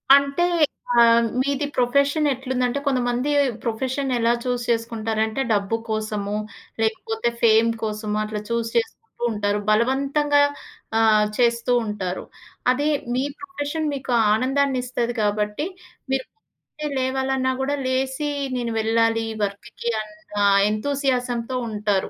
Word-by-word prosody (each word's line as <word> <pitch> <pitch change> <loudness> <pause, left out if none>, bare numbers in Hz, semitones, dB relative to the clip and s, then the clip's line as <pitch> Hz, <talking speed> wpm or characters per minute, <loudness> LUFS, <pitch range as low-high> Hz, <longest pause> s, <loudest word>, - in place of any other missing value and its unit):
అంటే, 280 +4 +2 0.5
ఆహ్, 235 -1 +6 0.2
మీది 280 +1 0
ప్రొఫెషన్ 280 +5 +2
ఎట్లుందంటే, 255 0 -1
కొంతమంది 250 0 0 0.3
ప్రొఫెషన్ 260 +4 -2
ఎలా 230 0 +3
చూజ్ 245 -1 -1
చేసుకుంటారంటే, 225 0 -1
డబ్బు 205 +1 0
కోసమో, 210 -1 -2 0.4
లేకపోతే 225 +1 0
ఫేమ్ 225 0 +5
కోసమో 215 -1 -2
అట్లా 215 0 -4
చూజ్ 235 -1 -1
చేసుకుంటూ 225 -1 0 0.3
ఉంటారు 205 -1 0
బలవంతంగా 275 +6 +2 0.6
ఆహ్, 215 -1 +5
చేస్తూ 235 0 +2
ఉంటారు. 190 -4 -3 0.5
అదే 285 +4 0 0.3
మీ 255 - +1 0.2
ప్రొఫెషన్ 315 -4 -3
మీకు 270 -2 -4 0.2
ఆనందాన్నిస్తది 255 -1 0
కాబట్టి, 210 +5 0 0.5
మీరు 265 -1 0 0.7
లేవాలన్నా 260 0 0
కూడా 280 +2 0
లేసి 265 +3 -1 0.3
నేను 240 -1 -2
వెళ్ళాలి 225 0 +2 0.2
వర్క్‌కి 205 +4 -4
అన్న 210 0 -13 0.3
ఎంతూసియాజంతో 250 0 -1
ఉంటారు. 210 -2 0
235 Hz, 105 wpm, -23 LUFS, 220-265 Hz, 0.7 s, ఆహ్